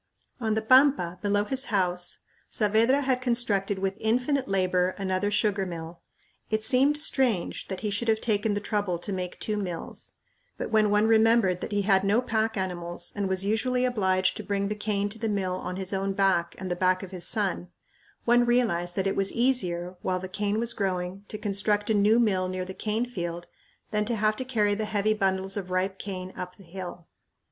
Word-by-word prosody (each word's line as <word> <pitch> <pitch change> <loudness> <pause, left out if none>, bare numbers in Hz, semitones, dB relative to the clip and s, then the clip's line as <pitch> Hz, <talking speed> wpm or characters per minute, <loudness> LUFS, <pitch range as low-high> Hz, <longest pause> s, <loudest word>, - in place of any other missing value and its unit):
On 220 -3 0
the 220 - -1
pampa, 255 -8 +4
below 205 0 +2
his 265 +5 0
house, 180 -4 +1 0.3
Saavedra 225 +6 +3
had 260 -2 0
constructed 215 -6 0
with 195 +1 -2
infinite 250 +5 +1
labor 185 -1 +1
another 190 0 0
sugar 205 -1 +1
mill. 170 -2 -7 0.5
It 215 0 0
seemed 270 +6 +3
strange 255 - 0
that 190 - -5
he 210 - -1
should 205 +4 -2
have 220 -1 +3
taken 210 -2 0
the 205 - -2
trouble 205 -4 -1
to 195 +4 -5
make 180 -1 -4
two 215 -1 -2
mills; 180 -5 -3 0.4
but - - -4
when 215 -1 +4
one 210 +1 +3
remembered 220 -4 +4
that - - -5
he 205 -1 +1
had 195 -1 +3
no 200 +4 +3
pack 220 -2 0
animals 175 -2 -3
and 200 -2 -1
was 190 +1 0
usually 250 +4 +1
obliged 190 -6 +1
to - - -5
bring 200 -1 -1
the 210 - -2
cane 210 -1 -1
to 225 +2 -7
the 225 0 -1
mill 195 -3 -1
on 185 0 -4
his 190 +1 -4
own 195 0 -1
back 190 -3 +1
and 185 -1 -5
the - - +1
back 185 +1 +1
of 190 - -8
his 180 -2 -2
son, 200 -5 0 0.6
one 240 0 +5
realized 225 -8 +1
that 190 - 0
it 195 - 0
was 195 0 +1
easier, 185 -8 0
while 185 -1 0
the 185 - -6
cane 205 +3 -1
was 235 0 0
growing, 190 0 -3
to 215 - -5
construct 205 +1 0
a - - +4
new 210 +3 +4
mill 190 -5 +2
near 185 0 -3
the 190 - -7
cane 220 +4 -1
field 175 -7 -5 0.5
than 210 0 +1
to 230 +2 0
have 215 0 +2
to 260 - -2
carry 215 -5 +1
the 215 +1 -2
heavy 215 0 +1
bundles 195 -2 0
of 195 -3 -4
ripe 185 +1 -1
cane 185 -2 -6
up 180 0 -6
the 195 - -16
hill. 175 -1 -8
200 Hz, 205 wpm, -27 LUFS, 185-220 Hz, 0.6 s, one